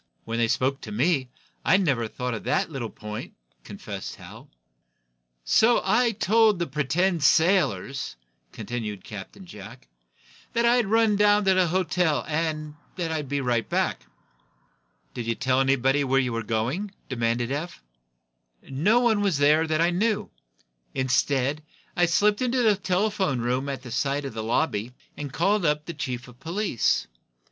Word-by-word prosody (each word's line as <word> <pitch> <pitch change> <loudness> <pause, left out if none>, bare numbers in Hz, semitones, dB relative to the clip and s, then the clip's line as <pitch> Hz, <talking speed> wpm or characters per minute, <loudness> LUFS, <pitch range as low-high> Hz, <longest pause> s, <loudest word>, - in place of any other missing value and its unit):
When 115 +1 -3
they 115 - +3
spoke 130 +4 0
to 105 - -8
me, 130 +3 +1 0.3
I - - +4
never 140 - +1
thought 125 +2 -4
of 115 - -5
that - - 0
little 125 -6 -4
point," 105 0 -8 0.3
confessed - - -7
Hal. - - -13 1.0
"So 230 - +4
I 235 +5 +3
told 220 0 +3
the 170 - -1
pretended 160 +5 0
sailors," 140 - +2 0.4
continued 110 -5 -5
Captain 110 - -9
Jack, 100 - -12 0.7
"that 235 0 +2
I'd 240 -2 +3
run 220 -1 +3
down 205 0 +4
to 190 - +5
the 185 -1 +3
hotel, 180 -3 0
and 155 -1 -2 0.2
that 170 -3 -3
I'd 150 -4 -3
be 140 0 -1
right 120 -3 0
back." - - -1 1.1
"Did 120 -2 -5
you 115 - 0
tell 130 +2 +1
anyone 135 +1 +2
where 135 +1 +4
you 125 -3 -1
were 115 - -2
going?" 115 - -2 0.2
demanded 120 -1 -1
Eph. 150 - -5 0.8
"No 195 - +2
one 225 -4 +2
was 195 -7 +1
there 150 +3 +4
that 155 0 +1
I 170 +1 +3
knew. 210 +3 0 0.6
Instead, 135 +2 +1 0.3
I 175 0 +3
slipped 205 +5 +2
into 250 0 +1
the 215 -2 +4
telephone 190 - 0
room, 125 +4 -1
at 135 -2 -5
the 125 - -9
side 140 +3 -1
of 135 - -5
the 110 - -4
lobby, 115 -1 -1 0.2
and 145 -2 -6
called 200 +7 +1
up 150 -1 +1
the 170 - -5
chief 130 -4 -5
of 125 0 -16
police. 175 - 0
150 Hz, 160 wpm, -25 LUFS, 125-190 Hz, 1.1 s, to